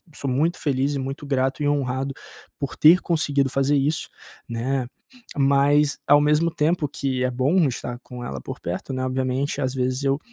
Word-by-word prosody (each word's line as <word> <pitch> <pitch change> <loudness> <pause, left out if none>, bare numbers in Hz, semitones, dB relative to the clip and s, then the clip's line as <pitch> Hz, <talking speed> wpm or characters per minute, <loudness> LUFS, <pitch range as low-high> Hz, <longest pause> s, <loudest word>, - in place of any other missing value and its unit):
sou 140 - -3
muito 155 +7 0
feliz 140 0 0
e - - -2
muito 135 +2 -5
grato 135 0 0
e - - +2
honrado 135 -1 -1 0.5
por 140 -2 -4
ter 170 +4 +7
conseguido 145 -5 +1
fazer 135 +2 +1
isso, 145 +3 0 0.4
né? 125 +2 -2 0.5
Mas 140 +1 +3
ao 145 +1 +6
mesmo 150 +3 +2
tempo 155 0 +1
que 130 -2 -2
é 130 - 0
bom 140 +7 +2
estar 120 -1 -5
com 125 -1 -9
ela 70 - -5
por - - -7
perto, 90 +10 -5
né, 130 0 -2
obviamente, 130 +2 -1
às 130 0 -1
vezes 130 +1 -1
eu 135 +1 +1
135 Hz, 180 wpm, -23 LUFS, 130-145 Hz, 0.5 s, ter